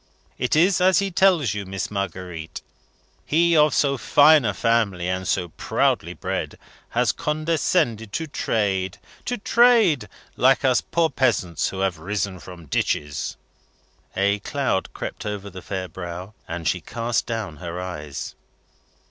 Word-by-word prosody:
It 125 +2 +1
is 180 +3 +4
as 185 0 +5
he 195 -1 +1
tells 170 - +3
you, 105 -1 -4
Miss 95 0 -4
Marguerite. 90 -4 -5 0.6
He, 170 +2 +3
of 150 -1 +5
so 140 -2 +1
fine 150 +3 +6
a 105 - +1
family, 100 -6 +1
and 90 0 -2
so 90 -2 0
proudly - - 0
bred, - - -4 0.3
has - - +2
condescended 150 - 0
to 165 - -2
trade. 95 - -1 0.3
To 245 - -2
trade! 220 - +4 0.3
Like 135 +2 +4
us 130 -2 +4
poor 165 -1 0
peasants 100 - +1
who 95 - -5
have 95 -4 0
risen 95 +1 -3
from 90 -2 -11
ditches!" 75 +1 -2 0.8
A 100 +2 +2
cloud 130 -3 -1
crept - - -6
over 100 -1 -5
the 95 0 -9
fair 95 -1 -4
brow, 90 +2 -7
and 85 -1 -4
she - - 0
cast 115 0 -2
down 110 -9 -4
her 85 +3 -6
eyes. 75 -6 -6
105 Hz, 145 wpm, -23 LUFS, 90-150 Hz, 0.8 s, fine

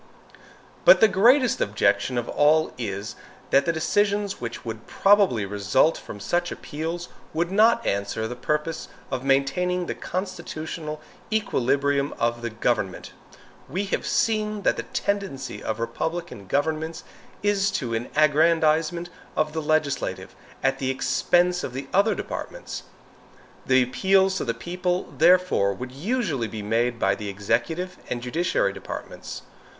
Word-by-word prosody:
But - - +8
the 220 - +7
greatest 245 - +4
objection 130 - +1
of 120 - -1
all 155 +2 +3
is, 100 -3 -4 0.4
that 140 - +5
the - - +4
decisions 205 +4 0
which 120 0 -6
would 110 -1 -6
probably 195 - +4
result 105 +10 +2
from 105 - -9
such 175 - -1
appeals 165 +3 -5 0.3
would 170 +2 0
not 225 +3 +4
answer 100 +2 -1
the 125 - -5
purpose 150 +5 -2 0.2
of 130 -1 -2
maintaining 175 +7 +1
the - - -3
constitutional 165 -4 -5 0.3
equilibrium 140 - +1
of 120 0 0
the 120 - -2
government. 110 -4 -1 0.6
We 190 +3 -1
have - - -1
seen 215 -2 0
that - - +3
the - - -3 0.2
tendency 195 -10 -2
of 110 0 -3
republican 125 - -4
governments 160 - -1 0.4
is 200 -1 +2
to 125 - -2
an 115 +2 -2
aggrandizement 160 +2 +3 0.2
of 155 0 0
the 160 - -2
legislative 155 -2 -1 0.3
at 135 0 +1
the 130 - -1
expense 175 +6 +2
of 125 - -4
the 135 +1 -5
other 200 +3 +4
departments. - - -6 0.9
The 130 -1 +5
appeals 190 +8 +2
to - - -2
the 115 -2 -1
people, 180 +6 -2
therefore, 180 - +4
would 125 +4 -7
usually 155 - -1
be 110 -2 -6
made 115 +3 +1
by 95 -3 +2
the 105 +1 -5
executive 120 - -2
and 120 - -2
judiciary 140 - 0
departments. - - -7
155 Hz, 140 wpm, -25 LUFS, 120-180 Hz, 0.9 s, But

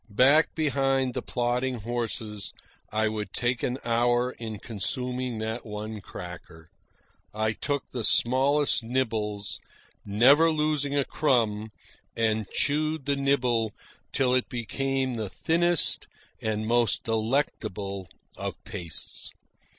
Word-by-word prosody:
Back 135 +9 +5
behind 135 -4 +1
the - - -2
plodding 125 0 -1
horses, 110 -2 -3 0.4
I 110 +1 +2
would 105 -3 -3
take 120 0 0
an 125 0 -1
hour 120 +1 +2
in 110 -3 -6
consuming 125 +4 -2
that 110 +2 -3
one 105 0 -6
cracker. 85 -3 -10 0.6
I 110 0 +1
took 145 +3 -3
the 120 -3 -3
smallest 135 +6 +4
nibbles, 110 -4 -2 0.4
never 130 +11 +6
losing 150 -2 0
a 140 - +2
crumb, 110 -7 +1 0.5
and 110 -2 +1
chewed 155 0 0
the 140 0 +2
nibble 125 -6 +1 0.4
till 125 -2 +2
it 130 -1 +1
became 130 +3 -1
the 110 -4 -3
thinnest 170 - +2 0.3
and 110 0 -1
most 120 0 +2
delectable 110 - -1 0.3
of - - -4
pastes. 90 -7 -4
120 Hz, 115 wpm, -27 LUFS, 110-135 Hz, 0.6 s, never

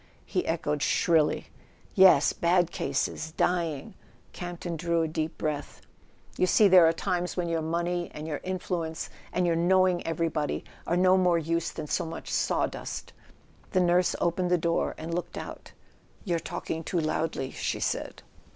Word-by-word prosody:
he 365 - -2
echoed 150 -3 -1
shrilly. 160 -1 +2 0.4
"Yes—bad 175 -1 +5
cases; 145 +3 -2
dying." 170 0 -1 0.4
Campton 175 -1 -5
drew 170 0 0
a - - 0
deep 155 +1 -3
breath. 150 -2 -3 0.6
"You 185 - +4
see 210 +3 +6
there 180 -3 +7
are - - +5
times 180 +1 -2
when 175 -1 0
your 165 -1 0
money 170 +2 -1
and 150 - -6
your 150 -2 -4
influence 175 -3 -3 0.2
and 180 - +1
your 170 -1 +2
knowing 185 +1 +3
everybody 160 -2 -1 0.2
are 170 - +1
no 185 +1 +5
more 180 -2 +3
use 165 +1 -1
than 155 - -6
so - - -1
much 160 - -7
sawdust - - -2 0.3
" - - -30
The 185 - +4
nurse 180 0 +3
opened 175 +1 0
the 180 - +4
door 170 0 0
and 165 +1 -5
looked 175 +1 -4
out. - - -8 0.5
"You're 170 -4 0
talking 165 0 -5
too 175 - -1
loudly," 155 -3 -1
she - - -3
said. - - -3
170 Hz, 160 wpm, -28 LUFS, 160-180 Hz, 0.6 s, there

